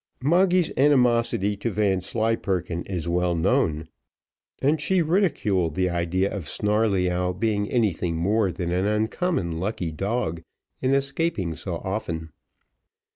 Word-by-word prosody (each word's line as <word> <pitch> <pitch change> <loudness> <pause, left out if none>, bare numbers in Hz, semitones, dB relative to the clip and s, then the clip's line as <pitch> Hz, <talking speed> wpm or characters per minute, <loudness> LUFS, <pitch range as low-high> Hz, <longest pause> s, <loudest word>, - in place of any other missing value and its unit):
Moggy's 175 +3 +3
animosity 120 -7 +3
to 115 - -2
Vanslyperken 95 -3 -1
is 90 -4 -4
well 90 0 +1
known, 80 - +1 0.7
and 150 +3 +1
she 180 +2 +2
ridiculed 110 - +1
the 90 -1 +1
idea 90 +4 0
of 90 -8 -6
Snarleyyow 95 -4 +1
being 105 +1 -1
anything 95 -8 0
more 100 +3 +1
than 85 0 -3
an 90 +3 +1
uncommon 105 - -1
lucky 90 -3 -2
dog 95 -1 -2 0.4
in 130 +1 +2
escaping 140 - -1
so 85 +2 -5
often. 85 -4 -4
100 Hz, 120 wpm, -24 LUFS, 90-120 Hz, 0.7 s, Moggy's